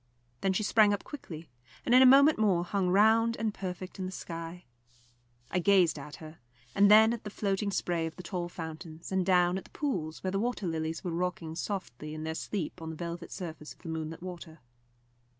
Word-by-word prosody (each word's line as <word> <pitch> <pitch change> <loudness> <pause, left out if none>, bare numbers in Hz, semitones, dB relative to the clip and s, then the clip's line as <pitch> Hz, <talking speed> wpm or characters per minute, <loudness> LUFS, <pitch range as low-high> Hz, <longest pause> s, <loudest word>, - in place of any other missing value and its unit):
Then 195 - +1
she 215 - 0
sprang 210 -1 +5
up 200 - -10
quickly, 165 - -9 0.4
and 240 - +2
in 255 - +8
a 260 - +9
moment 280 +1 +7
more 190 -5 +3
hung 190 -1 0
round 220 +4 +4
and 220 -2 -1
perfect 185 -1 -6
in 185 - -2
the - - -6
sky. 170 -1 -7 0.9
I 180 - +1
gazed 180 -4 +4
at 145 +1 -9
her, 155 0 -11 0.3
and 200 0 +5
then 220 +2 +7
at 235 - -6
the 210 - -5
floating 200 0 -1
spray 175 -4 -1
of 160 - -8
the 180 - -9
tall 175 -1 -3
fountains, 160 0 -8
and 190 -1 +2
down 180 0 +3
at - - -14
the - - -16
pools, 180 - -3
where 185 - -1
the 195 - 0
water 235 -2 -2
lilies 160 -1 -3
were 175 - -3
rocking 170 -2 -3
softly 155 - -5
in 155 - -6
their 160 0 -2
sleep 175 0 -4
on 160 - -5
the 160 - -6
velvet 170 +1 -6
surface 160 -5 -7
of - - -26
the 165 - -6
moonlit 160 +1 -5
water. 170 -3 -9
180 Hz, 210 wpm, -30 LUFS, 165-200 Hz, 0.9 s, a